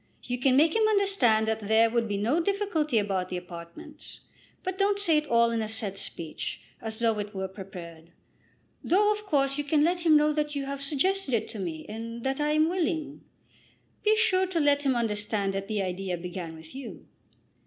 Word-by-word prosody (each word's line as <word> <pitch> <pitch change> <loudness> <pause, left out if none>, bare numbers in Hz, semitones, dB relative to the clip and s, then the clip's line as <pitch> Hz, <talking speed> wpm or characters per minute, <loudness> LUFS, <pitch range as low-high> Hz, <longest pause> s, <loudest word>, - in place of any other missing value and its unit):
You 245 0 -3
can 255 0 +3
make 315 +4 +4
him 440 -1 +4
understand 390 - +3
that 220 0 0
there 220 +2 +4
would 235 -1 +1
be 205 -1 -2
no 235 +11 +1
difficulty 340 - 0
about 195 -3 0
the 180 - -3
apartments. 170 -1 -10 0.4
But 375 +1 -4
don't 400 0 +3
say 340 -6 +3
it 300 - -8
all 235 0 +4
in 230 -1 0
a 215 - -3
set 205 -3 -1
speech, 165 -4 -5 0.2
as 220 -1 -5
though 225 -2 +1
it 205 0 -5
were 190 0 -2
prepared, 175 -4 -10 0.7
though 415 +4 +3
of 425 0 -4
course 275 -3 +1
you - - 0
can 290 +1 +2
let 345 +2 +2
him 315 -3 +6
know 300 0 +3
that 295 -1 -1
you 280 -1 -2
have 280 0 -5
suggested 295 +1 0
it 220 - -1
to 220 - -7
me 165 -4 -5
and 230 +2 -7
that 270 +1 -1
I 295 0 +1
am 310 +1 +4
willing. 325 -4 -2 0.8
Be 430 0 +3
sure 380 -4 +3
to 360 -2 -1
let 290 -1 +3
him 260 - +3
understand 210 -3 -1
that 195 0 -4
the 210 -2 -1
idea 185 0 -3
began 175 -1 -6
with 160 0 -13
you." 265 -2 -9
245 Hz, 205 wpm, -27 LUFS, 205-315 Hz, 0.8 s, him